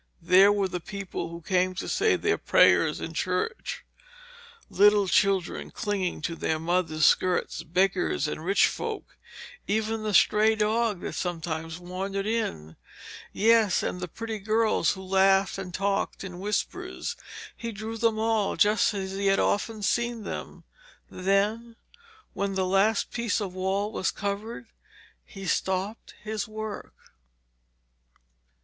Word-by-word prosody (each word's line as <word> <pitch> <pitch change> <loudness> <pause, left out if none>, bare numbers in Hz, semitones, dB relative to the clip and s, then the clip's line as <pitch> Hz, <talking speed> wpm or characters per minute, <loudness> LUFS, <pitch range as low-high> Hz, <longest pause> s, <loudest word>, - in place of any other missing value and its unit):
There 190 +4 +6
were 200 -2 +1
the 180 -1 -4
people 190 -2 -6
who 170 0 -9
came 185 +1 +1
to 190 - -4
say 420 0 +2
their 420 +3 0
prayers - - +4
in - - -6
church, 450 +1 -2 0.8
little 205 0 +4
children 195 -2 +1
clinging 195 -7 -3
to 170 - -2
their 160 -1 -1
mothers' 165 -2 +1
skirts, 185 -1 +2
beggars 180 -2 +1
and 155 - -5
rich 195 +4 +4
folks, 445 -3 -4 0.5
even 220 +1 -1
the 215 -2 -1
stray 215 +4 +5
dog 215 -2 0
that - - -5
sometimes 165 -2 -4
wandered 190 +2 -4
in. 80 - -3 0.5
Yes, 220 -2 +3
and 180 - -3
the 180 - -3
pretty 225 +4 -6
girls 215 +2 +2
who 190 -1 -9
laughed 195 +1 +3
and 185 -2 -6
talked 195 +2 -1
in 180 -2 -7
whispers. 365 - -3 0.4
He 230 0 -5
drew 220 +1 -6
them 225 -1 +1
all, 220 -2 +1
just 210 +1 +3
as 190 -1 -3
he 195 +1 -1
had 195 0 +4
often 215 +1 0
seen 235 +1 0
them. - - -7 0.5
Then, 205 +5 0 0.6
when 200 0 -2
the 190 -1 +1
last 195 +3 +2
piece 235 -2 -1
of 195 -4 -4
wall 190 +3 -1
was 185 - -1
covered, 210 +4 -4 0.6
he 195 -1 -10
stopped 190 +4 -2
his 215 +1 -3
work. 215 -1 -7
200 Hz, 140 wpm, -27 LUFS, 185-220 Hz, 0.8 s, There